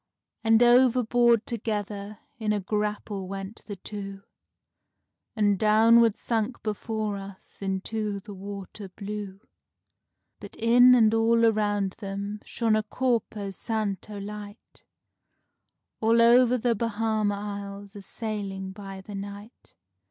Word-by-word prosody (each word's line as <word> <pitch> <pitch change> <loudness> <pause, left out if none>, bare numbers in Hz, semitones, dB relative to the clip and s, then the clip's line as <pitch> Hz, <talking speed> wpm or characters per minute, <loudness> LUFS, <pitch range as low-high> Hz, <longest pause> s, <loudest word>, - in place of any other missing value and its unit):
And 225 +1 +5
overboard 240 -2 +4
together 210 -2 -4 0.2
in 215 -1 0
a 210 - 0
grapple 210 -1 -3
went 195 +2 -7
the 205 - -5
two, 195 0 -8 1.1
And 205 -3 +2
downward 225 +1 +5
sunk 230 +1 -2
before 215 -1 -2
us 195 0 -11
into 200 +2 -2
the 205 +1 -10
water 200 0 -8
blue; 200 0 -7 1.0
But - - -11
in 245 +2 +6
and 220 -3 +5
all 230 +1 +4
around 205 -3 +1
them 200 0 -5
shone 225 -2 0
a 215 - +2
corpo 220 -3 -1
santo 210 0 -3
light, 205 +1 -9 1.2
All 225 +1 +3
over 245 +1 +6
the 240 0 +1
Bahama 220 -2 0
Isles 200 0 -7
a 205 - -8
sailing 195 -3 -4
by 195 -1 -9
the 205 +2 -10
night. 200 +3 -9
210 Hz, 115 wpm, -26 LUFS, 200-225 Hz, 1.2 s, in